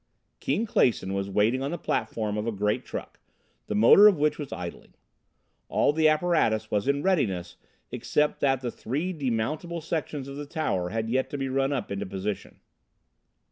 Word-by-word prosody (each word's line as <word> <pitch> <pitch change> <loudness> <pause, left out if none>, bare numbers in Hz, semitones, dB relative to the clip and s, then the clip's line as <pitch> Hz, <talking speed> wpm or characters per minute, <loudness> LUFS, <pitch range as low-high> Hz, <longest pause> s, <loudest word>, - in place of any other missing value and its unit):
Keane 225 - 0
Clason 105 - +1
was 100 0 -2
waiting 110 +6 +2
on 135 - -2
the 175 - -3
platform 105 -9 -2
of 105 +1 -2
a - - +1
giant 105 0 -1
truck, - - -7 0.5
the - - -2
motor 120 - +8
of 200 -5 +4
which 150 +1 +1
was 145 -3 -6
idling. 85 -1 -7 0.7
All - - +2
the 155 0 +4
apparatus 155 -10 +1
was 105 +4 0
in 140 +1 +1
readiness 95 - 0 0.4
except 150 0 0
that 135 -2 +2
the 120 -2 -3
three 150 +13 -3
demountable 150 +5 -2
sections 145 -4 -3
of 140 0 -7
the 145 0 -6
tower 95 - -1
had 110 +3 -2
yet 130 +3 0
to 145 - -4
be 135 -1 -2
run 135 +1 +1
up 135 -7 -3
into 100 0 -3
position. 100 +2 -5
130 Hz, 180 wpm, -27 LUFS, 105-150 Hz, 0.7 s, motor